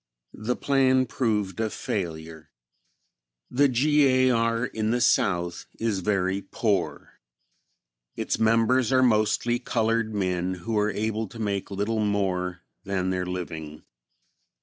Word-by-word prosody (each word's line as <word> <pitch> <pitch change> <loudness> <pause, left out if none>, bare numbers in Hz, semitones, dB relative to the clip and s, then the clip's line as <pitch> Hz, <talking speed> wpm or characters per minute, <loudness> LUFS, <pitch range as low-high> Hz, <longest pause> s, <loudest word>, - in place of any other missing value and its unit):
The 125 +3 0
plan 130 -2 +3
proved 105 -6 -1
a 110 -1 0
failure. 80 -6 -5 1.0
The 140 +3 +4
G. 145 +3 +3
A. 130 0 +4
R. 115 0 +1
in 110 -3 -2
the 120 +2 +1
South 85 -6 +1
is 110 -4 -1
very 95 0 0
poor. 100 -1 -2 1.0
Its - - -2
members 115 +2 +3
are 130 0 +4
mostly 115 +1 +2
colored 115 -2 0
men 95 -2 -1
who 90 +6 -4
are 105 0 +2
able 110 +2 -2
to 115 - -12
make 100 -3 -2
little 105 +3 -1
more 90 -3 -1 0.2
than 95 -2 -1
their 90 -1 -2
living. 80 -4 -6
105 Hz, 125 wpm, -26 LUFS, 95-115 Hz, 1.0 s, The